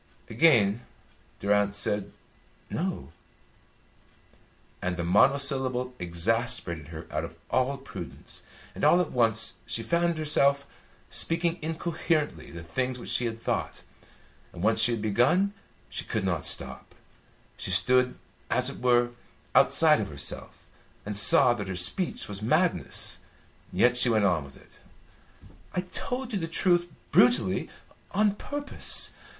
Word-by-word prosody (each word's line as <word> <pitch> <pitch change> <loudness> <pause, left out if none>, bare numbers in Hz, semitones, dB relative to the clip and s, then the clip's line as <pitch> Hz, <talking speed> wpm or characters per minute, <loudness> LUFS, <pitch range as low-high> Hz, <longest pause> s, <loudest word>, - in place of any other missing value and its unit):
Again 115 -5 +4 0.6
Durrance 100 0 +1
said 105 -1 -2 0.6
"No," 185 +2 -3 1.7
and 90 -1 -2
the 85 - -2
monosyllable 130 - +2
exasperated 90 - 0
her 80 0 -9
out 75 +1 -2
of 85 0 -8 0.2
all 130 +2 +1
prudence, 135 - -9 0.3
and - - -8
all 175 - +5
at 180 - -1
once 115 -2 +1
she 115 - -1
found 170 +5 0
herself 140 -2 +2 0.5
speaking 170 +1 +1
incoherently 160 -1 -2
the 85 -1 -9
things 125 +10 -3
which 120 - -7
she 125 - +1
had 115 0 -6
thought. - - -3 0.7
And 85 - -8
once 110 +1 +2
she 120 - +5
had 110 -2 -4
begun, 125 - +2 0.3
she - - -6
could - - -3
not - - -1
stop. - - -1 0.6
She - - -6
stood, 125 +7 +2 0.3
as - - +1
it - - -11
were, 120 -1 +3 0.4
outside - - +4
of - - -4
herself, - - -7 0.4
and 105 0 -4
saw 110 +4 +6
that 105 -4 -5
her 95 - -4
speech 90 - -1
was 100 -1 -6
madness; 140 - 0 0.5
yet 125 0 +3
she 125 0 +5
went 110 -3 +2
on 85 -6 +1
with 70 - -15
it. - - -21 1.0
"I 180 - +1
told 250 +7 -5
you 200 - 0
the 165 - -3
truth 175 +1 +2 0.2
brutally 120 -6 +3 0.4
on 210 +1 +3
purpose. 285 +7 -1
120 Hz, 135 wpm, -27 LUFS, 100-160 Hz, 1.7 s, saw